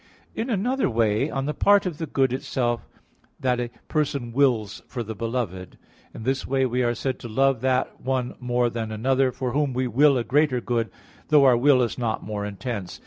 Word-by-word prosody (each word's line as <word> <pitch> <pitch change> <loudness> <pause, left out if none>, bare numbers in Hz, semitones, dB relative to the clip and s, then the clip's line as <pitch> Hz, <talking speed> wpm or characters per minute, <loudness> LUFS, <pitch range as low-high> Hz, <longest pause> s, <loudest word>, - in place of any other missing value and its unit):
In 230 +4 -3
another 245 - +1
way 115 +3 +1
on 135 -2 -2
the 150 - -1
part 200 +3 +4
of 170 -5 -4
the 160 - -3
good 135 -2 +1
itself 120 -2 -2 0.5
that 125 -2 +1
a 120 -1 -2 0.2
person 140 -5 -1
wills 120 -6 +1
for 120 -2 -4
the 110 0 -6
beloved. 110 -5 -4 0.3
In - - -9
this 130 +2 -1
way 135 0 +2
we 125 0 0
are 120 -1 +1
said 130 +2 -3
to - - -7
love 135 +1 +2
that 130 -1 0
one 130 -1 -1
more 120 -1 0
than 115 -2 -4
another, 130 +4 +1
for 125 0 -3
whom 145 0 0
we 130 +1 0
will 135 +4 +4
a 120 - 0
greater 135 +1 +2
good, 115 -1 -1 0.4
though 150 -3 +5
our 130 -2 +6
will 130 +1 +4
is 120 - -3
not 115 -3 -1
more 105 0 -4
intense. 100 -2 -5
125 Hz, 200 wpm, -24 LUFS, 115-135 Hz, 0.5 s, our